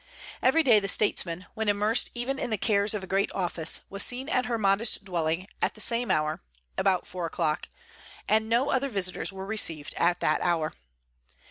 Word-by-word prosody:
Every 320 +6 +4
day 235 -7 +6
the 195 - -4
statesman, 185 -3 +1
when 220 -1 -1
immersed 210 +3 +1
even 260 +3 -3
in - - -3
the 215 - 0
cares 205 0 +1
of 200 - -4
a - - -5
great 195 +1 0
office, 170 -3 0
was 200 +1 -4
seen 255 +6 -2
at 255 -4 +1
her 235 -1 -1
modest 200 +1 +1
dwelling, 170 -1 -1 0.2
at - - 0
the - - -14
same 235 +2 +1
hour, 155 0 0 0.3
about 190 -2 +1
four 180 -2 -4
o'clock, 160 -2 -2 0.6
and 220 +1 +2
no 245 +5 +2
other 270 +1 0
visitors 195 -5 0
were 190 0 -7
received 170 -8 0
at 175 +1 +2
that - - +1
hour. 165 -3 0
200 Hz, 190 wpm, -27 LUFS, 180-230 Hz, 0.6 s, day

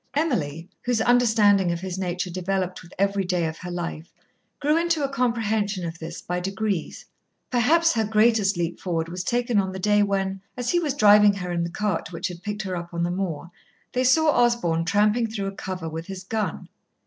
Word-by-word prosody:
Emily, 170 - -1
whose 245 -2 0
understanding 220 -6 +4
of 170 0 -3
his 190 -1 -4
nature 180 0 -2
developed 185 0 -2
with 170 - -15
every 200 0 +1
day 180 -2 0
of 160 0 -4
her 180 - -7
life, 170 -2 -5 0.5
grew 295 +2 +2
into 335 -2 +1
a 275 - 0
comprehension 220 -7 0
of 165 0 -6
this 165 +1 -7
by 180 0 -2
degrees. 195 -1 -3 0.5
Perhaps 325 +8 +3
her 225 - +1
greatest 215 -2 +3
leap 170 0 -2
forward 165 -3 -2
was 180 +1 -4
taken 240 -1 +1
on 190 -1 -1
the - - -5
day 210 +2 +3
when, 195 -1 -1 0.2
as 245 -1 -1
he 350 - +3
was 300 -5 -1
driving 210 -3 +6
her 180 -2 -4
in 170 -1 0
the 170 - -3
cart 190 -2 -2
which 170 +1 -3
had 175 -1 -9
picked 210 +2 -4
her 185 -1 -3
up 170 0 -6
on 170 - 0
the 175 - 0
moor, 175 -3 -3 0.4
they 255 - 0
saw 305 +5 +4
Osborn 235 - +2
tramping 210 +5 +2
through 215 -3 -4
a 195 - -2
cover 185 -4 -5
with 160 +1 -6
his 190 -1 -7
gun. 215 +2 -3
195 Hz, 205 wpm, -24 LUFS, 175-225 Hz, 0.5 s, driving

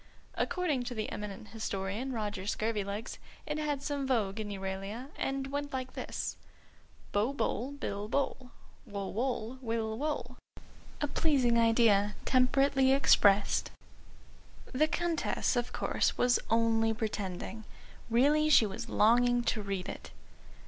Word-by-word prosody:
According 320 -8 0
to 245 0 -4
the 215 - -3
eminent 210 0 -6
historian, 215 +3 -3
Roger 205 -5 -3
Scurvilegs, 210 0 -2 0.3
it 300 0 -3
had 295 -2 -2
some 280 -2 -2
vogue 220 -5 0
in 215 -1 -4
Euralia 195 +5 -5
and 270 0 -2
went 285 0 -3
like 255 -1 -4
this: - - -4 0.7
"Bo, 210 +6 +1
boll, 275 -1 -2
bill, 205 -7 -4
bole. 260 -1 -1 0.4
Wo, 200 -1 -4
woll, 245 +1 -2
will, 225 -2 -2
wole." 300 +1 -3 0.6
A 295 - +1
pleasing 265 -7 +2
idea, 225 -3 +4
temperately 265 +1 +3
expressed. 205 -7 +4 1.0
The 300 +4 +3
Countess, 335 -4 0
of 245 0 -1
course, - - 0
was 245 0 +3
only 225 0 +2
pretending. 215 -1 -4 0.5
Really 290 +6 +4
she 260 -7 +7
was 230 +4 -5
longing 245 +3 +4
to 220 - 0
read 195 -2 -3
it. - - -7
235 Hz, 130 wpm, -31 LUFS, 210-270 Hz, 1.0 s, she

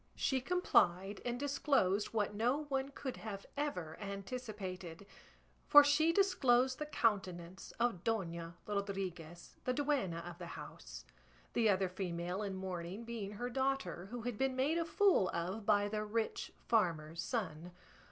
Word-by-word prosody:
She 265 -1 +1
complied 200 - +2
and 245 0 -2
disclosed 270 -8 +2
what 210 -2 -1
no 245 +8 +1
one 270 0 0
could 270 -2 -5
have 200 -3 -6
ever 180 - -3
anticipated, 200 -4 -6 0.6
for 290 0 +10
she 300 +3 +4
disclosed 265 -10 +3
the 300 - -3
countenance 190 - -1
of 230 -7 +1
Dona 170 -6 -2
Rodriguez, 190 -5 -4
the 255 - +1
duenna 260 - 0
of 175 0 -8
the 175 - -6
house; - - -9 0.5
the 225 -2 +3
other 190 -1 +3
female 180 0 -3
in 200 -2 -3
mourning 185 +2 -5
being 225 -4 -5
her 245 +4 -4
daughter, 265 -9 -1
who 240 0 -5
had 240 -3 -3
been 265 -1 +1
made 290 +6 +2
a 335 - 0
fool 340 - +4
of 190 +5 -3
by 205 -1 +4
the 210 +1 -2
rich 220 +1 -2 0.2
farmer's 170 -7 +1
son. 180 -7 -3
210 Hz, 145 wpm, -36 LUFS, 180-255 Hz, 0.6 s, for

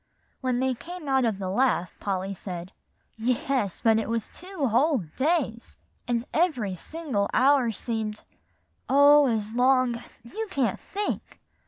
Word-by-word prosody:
When 255 -2 0
they 260 0 +1
came 345 +5 -9
out 265 -2 +3
of 220 -4 0
the 195 -1 -4
laugh, 240 -5 +1
Polly 195 -1 -2
said, 180 -1 -7 0.5
"Yes, 250 - -1
but 225 -1 +4
it 220 - -3
was 230 -1 -2
two 360 -7 -3
whole 255 - +2
days; 265 -6 -1 0.3
and 240 -1 0
every 270 - +1
single 250 - -3
hour 265 -2 +4
seemed 220 -1 -3 0.7
oh, 285 +1 +7
as 220 -2 -1
long 250 -1 +3 0.2
you 435 - -5
can't 255 - 0
think! 410 +1 -3
245 Hz, 140 wpm, -26 LUFS, 220-285 Hz, 0.7 s, oh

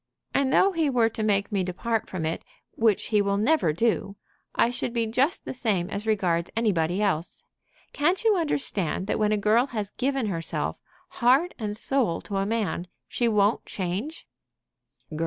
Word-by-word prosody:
"And 275 -1 +2
though 390 - +5
he 325 -5 +1
were 240 -4 +3
to 225 - -5
make 205 -1 +1
me 195 -2 +1
depart 215 +5 -2
from 180 -4 -3
it, 160 - -2 0.3
which 220 -3 +1
he 210 -2 +3
will 200 0 0
never 225 - +3
do, 200 +2 0 0.4
I 235 - +3
should 245 -1 -3
be 230 -2 +1
just 255 +9 0
the - - -4
same 205 -7 -1
as 210 +2 -3
regards 175 -6 +1
anybody 195 -4 +1
else. 175 -4 -1 0.5
Can't 345 +8 +1
you 440 -2 +4
understand 270 - -1
that - - -1
when 210 0 +2
a 215 - +2
girl 220 +5 +3
has 210 -5 -4
given 270 0 -1
herself, 165 -5 -3 0.3
heart 270 +9 +3
and 210 -2 -3
soul, 240 -9 +1
to 200 - -4
a 195 0 0
man, 205 -6 -1 0.2
she 240 - 0
won't 210 0 +2
change?" 200 - -4
215 Hz, 175 wpm, -26 LUFS, 195-250 Hz, 0.5 s, though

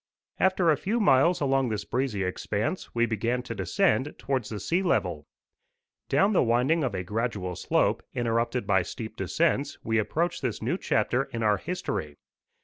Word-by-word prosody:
After 185 -3 +3
a 150 - +2
few 220 - -1
miles 170 - +4
along 135 -2 +2
this 105 -2 -3
breezy 125 -6 -1
expanse, 105 - -3
we 120 0 +3
began 120 +2 -1
to - - -5
descend 175 -8 +1
towards 130 -5 -2
the 105 - -5
sea 165 - 0
level. 180 - 0 0.8
Down 200 +2 +3
the - - +4
winding 125 +7 +2
of 120 -7 -1
a 90 - -2
gradual 105 -3 -2
slope, - - +1
interrupted 120 0 0
by 95 -2 +3
steep 110 +4 -7
descents, 155 -1 0
we 110 0 +1
approached 165 +11 -1
this 125 -6 -2
new - - -1
chapter 125 +3 +1
in 115 -4 -5
our 105 -1 +3
history. 95 - -4
125 Hz, 165 wpm, -27 LUFS, 110-155 Hz, 0.8 s, miles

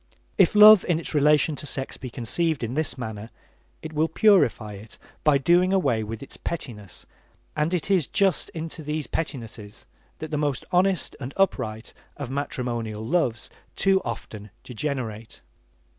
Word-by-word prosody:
If 190 +1 +4
love 210 -1 +9
in 170 -3 +1
its 165 - -4
relation 150 +1 +3
to 145 - -6
sex 135 -1 -3
be 130 - -8
conceived 135 +6 -1
in 115 +1 -3
this 155 0 -2
manner, 110 -2 -6 0.5
it 160 0 -7
will 155 +1 +2
purify 160 - +3
it 105 +3 -11 0.3
by 150 -2 +5
doing 175 +6 +3
away 125 - +1
with 115 +3 -6
its - - -9
pettinesses 105 - -7 0.5
and 150 +2 0
it 180 +1 -1
is 180 -7 +3
just 195 -2 +1
into 165 0 -6
these 150 0 -3
pettinesses 115 -9 -6 0.3
that 155 0 -7
the 150 - -1
most 145 -3 -1
honest 185 0 +1
and 135 0 -7
upright 110 - -1 0.2
of 140 -4 -6
matrimonial 120 -6 -3
loves 120 -7 0 0.2
too 195 -1 +3
often 110 -3 -7
degenerate. 120 -4 -5
145 Hz, 155 wpm, -25 LUFS, 115-165 Hz, 0.5 s, love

